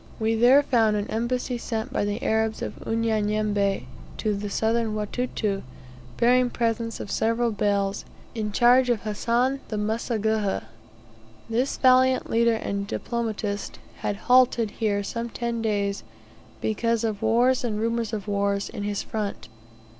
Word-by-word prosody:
We 220 0 +1
there 245 +5 +6
found 225 -6 +3
an 205 0 -2
embassy 245 +2 -1
sent 230 +3 -4
by - - 0
the 205 +1 -3
Arabs 220 0 0
of - - -6
Unyanyembe, 215 -3 0 0.3
to 215 -2 0
the 205 0 -4
Southern 225 +1 0
Watuta, 210 -2 -2 0.6
bearing 250 +1 +4
presents 230 -1 -1
of 200 - -6
several 230 +1 +1
bales, 200 -1 0 0.3
in 215 -2 -3
charge 245 +4 +5
of 235 -3 +1
Hassan 235 +5 0
the 215 - -4
Mseguhha. 220 - -1 0.8
This 240 +4 0
valiant 255 0 +4
leader 230 0 +3
and 200 -2 -3
diplomatist 215 -3 -3 0.2
had 205 - -2
halted 245 -3 +4
here 205 -2 +1
some 230 +3 -4
ten 235 0 -3
days 200 -2 -1 0.6
because 230 +1 0
of 215 -3 -2
wars 240 +4 +3
and 220 -4 -1
rumours 230 0 -1
of 210 -2 -4
wars 200 0 0
in 220 - -6
his 205 0 -2
front. 210 -2 -4
225 Hz, 140 wpm, -25 LUFS, 210-235 Hz, 0.8 s, there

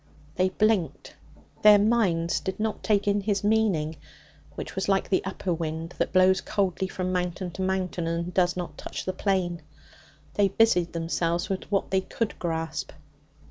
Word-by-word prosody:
They 185 +2 +2
blinked. 200 -5 0 0.5
Their 210 -1 +8
minds 200 -6 +2
did 190 +1 -5
not 220 0 -2
take 205 -2 +1
in 205 0 +2
his 200 -1 -1
meaning, 200 -8 +1 0.6
which - - -6
was 190 +1 -2
like 195 -1 +2
the 190 - +2
upper 190 -1 -2
wind 165 +1 -4
that - - 0
blows 185 0 +4
coldly 190 -1 -1
from 185 -1 -3
mountain 180 0 -2
to 190 - -6
mountain 185 -2 -1
and 170 +2 -2
does 180 -1 +2
not 175 -1 -5
touch - - -6
the 185 - -1
plain. 185 -3 -1 0.7
They 205 -1 +3
busied 195 -4 +2
themselves 170 +1 -1
with 190 +1 -4
what 195 - 0
they 190 0 +3
could 210 +3 -3
grasp. 165 -2 -3
185 Hz, 165 wpm, -26 LUFS, 170-200 Hz, 0.7 s, Their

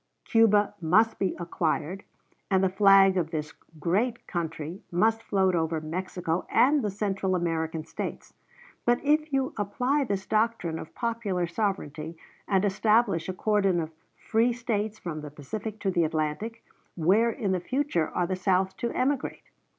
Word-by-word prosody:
Cuba 210 -3 +4
must 210 +8 +3
be 190 -2 0
acquired, 170 +1 -2 0.5
and 190 -1 +3
the 190 - +3
flag 195 0 +6
of 165 -3 0
this 155 -2 -4 0.3
great 215 - 0
country 160 0 -4
must 220 +6 +2
float 190 -4 +1
over 160 -1 0
Mexico 170 +1 -3
and 285 +3 +4
the 210 - -1
Central 195 -2 -1
American 160 -2 -2
States. - - -6 0.5
But 240 0 +3
if 305 +1 +2
you 270 -1 0
apply 250 +8 0
this 195 -4 -2
doctrine 215 -7 0
of - - -10
popular 225 -7 -1
sovereignty, 170 -4 -3 0.3
and 195 0 +2
establish 205 -3 +2
a - - -1
cordon 195 -2 +2
of 160 -1 -3 0.3
free 230 +2 +1
States 220 -3 -2
from 160 -6 -5
the 150 - -7
Pacific 200 +10 -6
to 195 - +1
the 175 -2 +2
Atlantic, 155 +9 -3 0.3
where 195 +8 +3
in 215 -4 -2
the 185 - +1
future 255 - -1
are 180 - 0
the 185 +2 -2
South 185 +1 +1
to 235 - -2
emigrate? 265 +1 -1
190 Hz, 155 wpm, -27 LUFS, 170-225 Hz, 0.5 s, flag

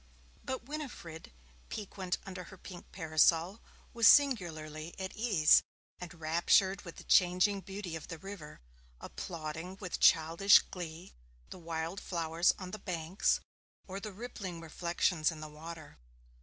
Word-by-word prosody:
But 260 -1 -4
Winifred, 255 - -7 0.4
piquant 190 -3 -4
under 185 -2 -7
her 190 - -13
pink 180 -1 -11
parasol, 165 +3 +2 0.3
was 230 -2 +5
singularly 165 - +3
at 190 0 -5
ease, 205 -9 +5 0.4
enraptured 175 +3 +2
with 170 - -10
the - - -11
changing 185 +2 +3
beauty 190 -3 -6
of 160 - -7
the 165 - -6
river, 190 - -10 0.4
applauding 165 +2 -6
with 185 -4 -4
childish 165 +4 +6
glee 170 -2 -7 0.4
the - - -8
wild 165 +2 -4
flowers 165 -1 +1
on 185 -1 -7
the 215 - -6
banks, 175 -1 0 0.5
or 190 0 -5
the 215 +1 -6
rippling 195 -5 -7
reflections 165 0 0
in 160 -2 -7
the 155 - -7
water. 155 - -10
175 Hz, 130 wpm, -32 LUFS, 160-195 Hz, 0.5 s, childish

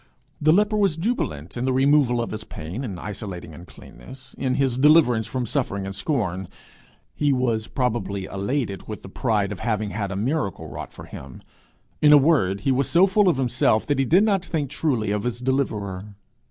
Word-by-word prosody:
The 155 +1 +5
leper 210 +4 +3
was 195 -6 +2
jubilant 160 - -3
in 120 +1 -2
the 130 - +1
removal 130 -2 +3
of - - -6
his 110 0 -5
pain 90 - -7
and 100 -9 -5
isolating 95 -5 -7
uncleanness, 90 - -13
in 130 -1 -1
his 130 -3 0
deliverance 135 -7 +5
from 125 +2 -3
suffering 105 -6 -2
and 95 - -5
scorn; 95 - -2 0.7
he 145 -1 +1
was 120 -4 0
probably 105 -7 -2
elated 100 +2 -3
with 110 - -7
the - - -9
pride 105 -2 0
of 105 - -6
having 110 -2 -1
had 105 -2 -3
a 95 - -4
miracle 115 - -2
wrought - - -7
for - - -11
him. 65 -1 -11 0.6
In 150 - +6
a 150 - +10
word, 135 - +2
he 135 - +1
was 130 +1 +1
so 175 +3 +5
full 195 0 +3
of 165 - +1
himself 120 -4 +1
that 145 -2 0
he 135 - +2
did 180 - +4
not 200 -4 +2
think 155 -7 -3
truly 120 -10 0
of 105 0 0
his 120 +1 -3
deliverer. 105 -7 -2
120 Hz, 195 wpm, -23 LUFS, 100-145 Hz, 0.7 s, a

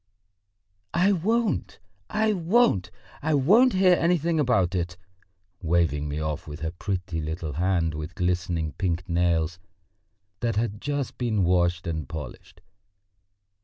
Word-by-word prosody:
"I 185 +4 +4
won't, 210 - 0 0.3
I 215 0 +1
won't, 175 - +2 0.3
I 155 +1 +1
won't 215 - +5
hear 185 -1 +5
anything 170 -1 +1
about 115 -10 +2
it!" 90 -1 -2 0.6
waving 80 -4 +1
me 75 +1 -3
off 75 -1 -3
with 75 +1 -8
her 80 0 -2
pretty 90 -2 -3
little 80 0 -4
hand 85 0 +1
with 75 +3 -6
glistening 90 -3 -1
pink 85 +4 -2
nails 85 -1 +1 0.8
that 115 -2 -1
had 105 -1 -2
just 145 -2 -3
been 110 -5 +1
washed 85 0 +2
and 80 -5 -4
polished. 85 +5 -8
90 Hz, 130 wpm, -26 LUFS, -, 0.8 s, won't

